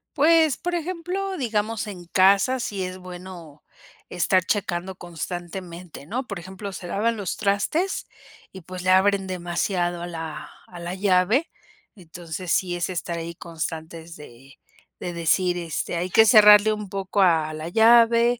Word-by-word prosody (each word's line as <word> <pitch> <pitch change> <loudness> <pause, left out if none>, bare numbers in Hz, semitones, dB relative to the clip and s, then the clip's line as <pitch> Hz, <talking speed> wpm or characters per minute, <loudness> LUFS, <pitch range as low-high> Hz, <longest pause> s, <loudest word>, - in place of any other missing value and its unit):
Pues, 315 -1 +4
por 355 0 -3
ejemplo 365 +3 -3
digamos 225 -3 -2
en 180 -4 -8
casa 200 +9 +3
si 200 -4 -3
es 185 0 -7
bueno 180 -4 -11 0.4
estar 180 +1 +1
checando 190 -2 -2
constantemente, 175 -1 -7
¿no? 245 - -4
Por 200 -6 -6
ejemplo 190 +3 -8
se 185 -2 -8
lavan 225 +5 0
los 200 -4 -3
trastes, 220 - -1 0.5
y 190 - -10
pues, 180 +2 -8
le 185 +1 +2
abren 195 +1 +3
demasiado 175 0 -2
a 175 - -5
la 160 -3 -7 0.2
a 175 - -11
la 175 +1 -5
llave, 195 - +2 0.5
entonces 175 0 -8
sí 175 -2 0
es 175 - -2
estar 170 -1 -4
ahí 170 0 -6
constantes 165 0 -7
de 135 -2 -15 0.4
de 175 - -4
decir 175 +2 +1
este 170 0 -3
hay 180 +2 -2
que 220 +4 +6
cerrarle 210 -1 +7
un 210 -1 -4
poco 195 +1 -2
a 160 -4 +3
la 155 +1 -6
llave 230 +3 +5
185 Hz, 155 wpm, -24 LUFS, 170-215 Hz, 0.5 s, cerrarle